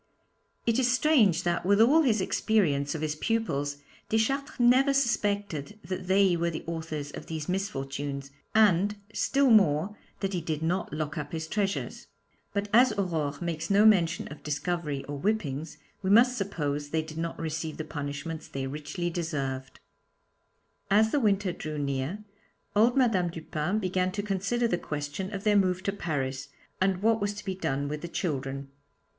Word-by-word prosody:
It 230 +1 +2
is 250 -1 +3
strange 235 - +4
that, 175 0 0
with 200 +3 +3
all 275 +9 +6
his 225 -9 +2
experience 160 -9 +1
of 155 - -4
his 155 -1 0
pupils, 150 -7 -1 0.3
Deschartres 270 +7 0
never 260 +3 +5
suspected 205 - 0
that 185 +1 -4
they 190 -1 +4
were 170 0 0
the 160 - -5
authors 160 -3 -4
of - - -9
these 160 -2 -4
misfortunes, 140 -7 -3 0.2
and, 205 -1 +4 0.2
still 275 -2 +2
more, 195 -2 +4 0.3
that 195 -1 -1
he 175 - -1
did 160 -1 -3
not 175 +3 -1
lock 155 +1 -3
up 145 +1 -6
his 160 -1 -3
treasures. 200 +1 -2 0.4
But 200 0 -1
as 245 0 +6
Aurore 160 -8 -1
makes 165 -1 -3
no 205 +2 +5
mention 175 -6 +4
of 150 - -10
discovery 150 -2 -2
or 145 -1 -5
whippings, 160 -6 -2 0.2
we 190 - -1
must 245 +5 +6
suppose 150 - -2
they 160 +1 0
did 160 0 -8
not 165 0 -3
receive 160 -1 -3
the 155 - -3
punishments 150 +2 -5
they 135 -1 -4
richly 150 +5 -4
deserved. 135 -6 -3 1.1
As 220 +2 +4
the 295 - +2
winter 205 -5 +2
drew 155 -2 -5
near, 140 +8 -2 0.5
old 235 +5 +4
Madame 215 -9 +3
Dupin 165 +3 -2
began 185 -2 0
to 205 - -2
consider 205 +4 0
the 175 -6 0
question 150 +6 -4
of 200 -1 -5
their 210 -1 +3
move 185 -2 +2
to 200 - 0
Paris, 140 -7 -3 0.3
and 190 0 +1
what 225 -1 +3
was 205 0 -1
to 210 - -9
be 190 - -1
done 140 -6 -2
with 150 +1 -4
the 170 - -5
children. 140 -5 -3
175 Hz, 170 wpm, -28 LUFS, 150-210 Hz, 1.1 s, all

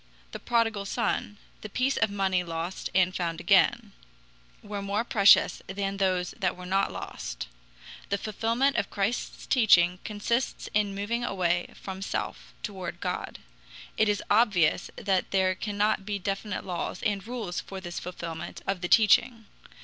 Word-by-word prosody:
The - - -6
prodigal 225 -4 +1
son, 205 -1 -1 0.2
the 215 - -7
piece 255 +6 +1
of 225 - +2
money 190 -2 +1
lost 170 +2 -4
and 185 0 +3
found 170 -2 -2
again, 175 - +3 0.7
were 205 -1 -5
more 200 +3 -1
precious 200 -4 +5
than 195 +1 -3
those 185 -2 +1
that 185 -3 0
were 180 - -8
not 195 +2 +1
lost. - - -6 0.6
The 200 - +1
fulfillment 230 +6 0
of 200 - 0
Christ's 205 +4 -2
teaching 180 -7 +4
consists 235 +4 -2
in 205 -2 +1
moving 225 +4 -2
away 175 -5 0
from 190 0 -7
self 195 - -4
toward 190 -5 -5
God. - - -3 0.6
It 220 -1 +3
is 205 -1 0
obvious 205 -7 +3
that 190 -2 0
there 190 -1 +2
cannot 205 +1 0
be 205 0 -2
definite 195 +1 -3
laws 180 -2 -4
and 200 -2 0
rules 225 -8 -3
for 195 - -8
this 175 -2 -6
fulfillment 170 -2 -7
of 195 -2 -2
the 175 - -2
teaching. 225 +1 +4
195 Hz, 150 wpm, -28 LUFS, 185-215 Hz, 0.7 s, precious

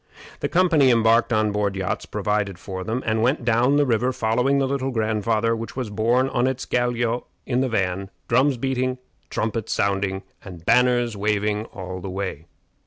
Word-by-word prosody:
The - - -2
company 170 -7 +4
embarked 115 0 +4
on 110 -2 +2
board 100 -1 -1
yachts 95 -1 -3
provided 105 -3 -1
for 95 0 -6
them, 115 +6 -3
and 110 0 +1
went 125 +2 +1
down 120 +4 +3
the 145 - +4
river 125 0 +1
following 125 +4 +1
the 135 - +2
Little 135 0 -1
Grandfather, 110 -1 0
which 115 0 -6
was 125 -5 -4
borne 120 +5 +2
on 125 -1 +1
its 130 -1 -2
galliot 120 -1 0 0.2
in 125 0 0
the 135 - 0
van 95 -3 -1 0.2
drums 130 +3 +3
beating, 130 0 -1 0.3
trumpets 110 0 -2
sounding, 95 -1 0 0.2
and 90 -4 -11
banners 120 -1 +3
waving 105 +1 0
all 95 -4 -7
the 95 - -6
way. 95 -4 -5
115 Hz, 175 wpm, -23 LUFS, 105-125 Hz, 0.3 s, company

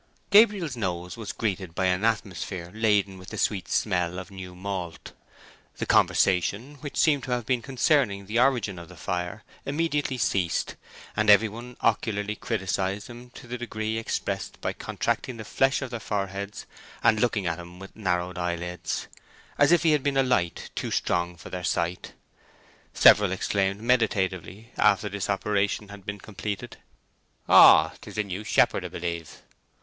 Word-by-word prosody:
Gabriel's 200 - +5
nose 90 -5 -3
was 110 -3 -5
greeted 95 -6 -3
by 95 - 0
an 90 +2 +1
atmosphere 95 -5 -2
laden 105 -3 +1
with 90 +2 -11
the 110 - -7
sweet 100 -2 0
smell 90 -4 0
of 95 +1 -7
new 90 -2 -9
malt. 90 -3 -5 0.7
The - - -2
conversation 100 - +2
(which 145 +1 -7
seemed 145 -4 +3
to 130 - -5
have 120 -2 -2
been 125 -1 +1
concerning 130 -6 +1
the 110 +4 0
origin 120 -8 +2
of 85 0 -11
the 90 - -12
fire) 90 +4 -4 0.2
immediately 145 -2 -1
ceased, 95 -7 0 0.4
and 105 0 +1
every 105 +2 +7
one 120 +3 -9
ocularly 105 -2 0
criticised 100 -2 -2
him 120 +1 -11
to - - -11
the 125 +1 -6
degree 110 -2 -3
expressed 115 - -3
by - - -2
contracting 125 -3 -2
the 110 - -7
flesh 135 +5 +1
of 130 - -6
their 120 - -4
foreheads 100 -1 -4 0.4
and 110 - +4
looking 110 -4 +1
at 85 0 -1
him 85 0 -10
with 95 +1 -11
narrowed 90 -3 -1
eyelids, 90 0 -3 0.5
as - - +5
if 175 - +5
he 165 - +4
had 150 -2 +3
been 140 0 0
a 135 - +5
light 125 -10 0
too - - -3
strong 85 0 0
for 85 - -12
their 90 -1 -5
sight. 85 +1 -2 0.8
Several 105 -3 +6
exclaimed 95 +1 0
meditatively, 105 -3 0
after 100 +1 +3
this 100 -1 -4
operation 100 +1 0
had 100 0 -12
been 105 0 -3
completed:— 100 -1 -6 0.7
"Oh, - - +8
'tis - - -10
the 105 - +1
new 100 +1 -5
shepherd, - - +2
'a - - -5
b'lieve." 85 -2 -5
100 Hz, 165 wpm, -26 LUFS, 90-115 Hz, 0.8 s, Oh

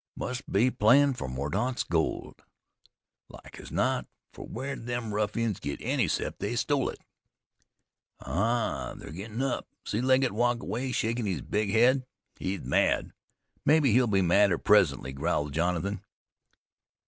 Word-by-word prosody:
"Must 125 +1 -5
be 120 +6 +3
playin' 135 +7 +5
fer 125 - -5
Mordaunt's 85 - -2
gold." 80 -2 -2 0.9
"Like - - -13
as - - -10
not, - - 0 0.3
for - - -9
where'd 135 -3 -5
them 120 -3 -3
ruffians 105 0 -1
get 70 - -4
any - - 0
'cept - - -2
they 105 +4 -2
stole 135 +2 +1
it." - - -8 1.2
"Aha! 100 - -1
They're - - -10
gettin' 110 - -5
up! 135 -2 -2 0.2
See 110 - -1
Legget 130 0 +3
walk 120 +2 0
away 125 +3 -3
shakin' 115 -1 -1
his 95 - -2
big 105 0 -1
head. 125 +5 +4 0.4
He's 95 +1 -3
mad. - - +1 0.5
Mebbe 155 +2 +4
he'll 125 0 +4
be 100 -3 +2
madder 100 +3 +4
presently," 75 - +3
growled 70 +1 -1
Jonathan. 90 +4 -1
110 Hz, 140 wpm, -28 LUFS, 95-125 Hz, 1.2 s, playin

